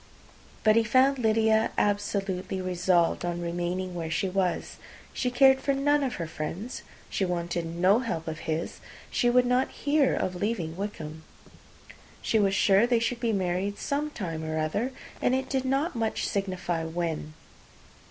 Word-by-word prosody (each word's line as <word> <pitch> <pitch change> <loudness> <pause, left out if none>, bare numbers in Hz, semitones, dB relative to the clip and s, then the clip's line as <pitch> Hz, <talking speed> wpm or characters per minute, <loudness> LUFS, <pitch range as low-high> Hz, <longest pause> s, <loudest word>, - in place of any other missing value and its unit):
But 215 -1 +5
he 230 - +5
found 260 +4 +3
Lydia 220 -1 +3
absolutely 195 -2 -1
resolved 180 -2 +1
on 175 0 -2
remaining 175 +2 -2
where 165 -2 -4
she 165 +4 0
was. 185 -1 -1 0.4
She 250 - 0
cared 265 +1 +5
for 275 - +1
none 290 +2 +2
of 265 -3 -1
her 170 - -3
friends; 170 +9 -5 0.3
she - - -2
wanted 175 -2 -2
no 180 +6 +3
help 165 -10 -3
of 160 0 -4
his; 160 +1 -2 0.3
she 240 - +2
would 250 +1 +4
not 250 +1 +2
hear 290 -2 +1
of 185 - -1
leaving 180 -4 -2
Wickham. 160 -6 -6 1.0
She 220 - +1
was 195 -1 +2
sure 200 +4 +4
they 240 -1 +3
should 230 +1 -1
be 235 -1 0
married 190 0 -1
some 290 +2 -2
time 165 - -5
or 155 0 -3
other, 180 +11 -1 0.3
and 255 - +3
it 260 0 -2
did 265 -1 0
not 275 +5 0
much 225 -1 -1
signify 185 -4 -2
when. 160 -2 -3
195 Hz, 160 wpm, -27 LUFS, 175-245 Hz, 1.0 s, But